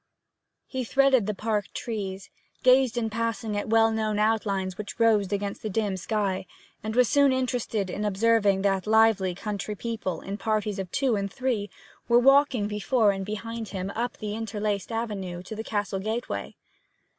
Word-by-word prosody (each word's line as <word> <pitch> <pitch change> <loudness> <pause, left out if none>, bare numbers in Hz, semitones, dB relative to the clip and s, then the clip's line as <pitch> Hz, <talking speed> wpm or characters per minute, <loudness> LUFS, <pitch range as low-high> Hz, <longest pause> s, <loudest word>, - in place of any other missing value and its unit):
He 260 -1 -3
threaded 265 -2 +3
the 210 - -1
park 210 -1 -1
trees, 195 -5 -5 0.3
gazed 255 -2 +5
in 225 -2 -1
passing 230 -1 -2
at 205 - -3
well 225 0 +5
known 215 -1 -1
outlines 205 -4 0
which 205 +3 -7
rose 215 -4 +3
against 200 0 -2
the 215 - -3
dim 205 -1 0
sky, 190 0 -2 0.3
and 220 +1 -4
was 250 -1 +5
soon 280 +2 +4
interested 245 -6 -1
in 205 +3 -4
observing 205 -1 +2
that 195 0 +1
lively 215 -4 +4
country 210 +1 -4
people, 210 -6 -4
in 200 +2 -6
parties 215 -2 -1
of 190 -2 -4
two 265 -5 +1
and 200 -1 -2
three, 240 -6 -1 0.4
were 235 - +5
walking 270 -3 +4
before 210 +1 +2
and 195 0 -4
behind 225 +1 -5
him 190 -1 -4
up 240 +2 -3
the 210 -2 -4
interlaced 210 -2 -3
avenue 195 -6 -4
to 220 - -7
the 220 - -5
castle 205 -3 -2
gateway. 220 +5 -4
215 Hz, 170 wpm, -26 LUFS, 200-230 Hz, 0.4 s, gazed